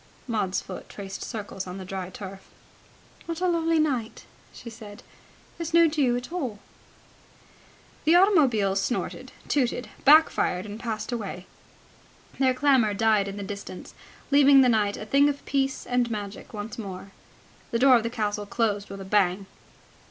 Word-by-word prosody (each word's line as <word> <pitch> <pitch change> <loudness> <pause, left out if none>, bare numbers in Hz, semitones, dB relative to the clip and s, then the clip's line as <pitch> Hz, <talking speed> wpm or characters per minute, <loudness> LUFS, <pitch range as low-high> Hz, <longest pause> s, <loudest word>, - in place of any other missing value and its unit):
Maud's 210 -5 -1
foot 185 - -9
traced 195 -1 -8
circles 205 -4 -6
on 180 +1 -6
the 190 - -7
dry 185 -1 -5
turf. 195 0 -9 0.8
"What 335 0 -4
a 365 - +1
lovely 330 -1 +1
night," 265 -8 -1 0.3
she - - -13
said. 210 -2 -11 0.6
"There's 335 0 -2
no 335 0 +7
dew 280 -6 +1
at 245 +5 -7
all." 265 -12 -3 1.5
The 320 +3 +5
automobiles 255 - +4
snorted, 240 +5 -3 0.2
tooted, 250 -3 0
back 310 +3 +7
fired, 180 +2 -1
and 210 +1 -8
passed 225 0 -4
away. 200 -6 -5 0.9
Their 260 -2 +3
clamour 255 -6 +3
died 215 -1 +2
in 195 +1 -6
the 200 - -5
distance, 200 -2 -8 0.4
leaving 280 -1 +7
the 255 - +4
night 210 -3 +1
a 210 - -7
thing 280 +6 +4
of 285 -1 -5
peace 270 -1 -1
and 245 -1 0
magic 205 -2 -6
once 215 +2 -7
more. 195 -2 -7 0.6
The 230 - 0
door 260 +1 +6
of - - 0
the 230 - -3
castle 210 -3 -3
closed 205 -2 -1
with 195 0 -8
a - - -8
bang. 195 -1 +1
225 Hz, 160 wpm, -26 LUFS, 200-275 Hz, 1.5 s, no